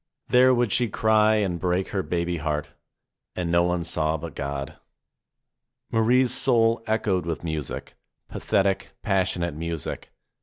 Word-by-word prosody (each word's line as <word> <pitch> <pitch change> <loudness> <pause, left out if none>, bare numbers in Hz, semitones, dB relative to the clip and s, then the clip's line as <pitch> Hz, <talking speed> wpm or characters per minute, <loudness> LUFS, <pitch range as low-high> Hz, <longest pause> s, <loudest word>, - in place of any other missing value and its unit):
There 130 +1 +6
would 120 -4 +1
she 125 0 +2
cry 110 +1 +3
and 95 -5 0
break 90 +1 0
her 95 - -1
baby 85 -1 -2
heart. 75 0 -2 0.7
And 85 -2 -2
no 85 0 +4
one 90 0 0
saw 80 -2 0
but 80 0 -8
God. 70 -1 -5 1.1
Marie's 120 +3 +3
soul 115 -4 +3
echoed 100 -6 0
with 85 -1 -3
music, 80 -5 -4 0.3
pathetic, 95 -1 -1
passionate 95 -4 0
music. 80 +1 -5
90 Hz, 130 wpm, -25 LUFS, 85-110 Hz, 1.1 s, There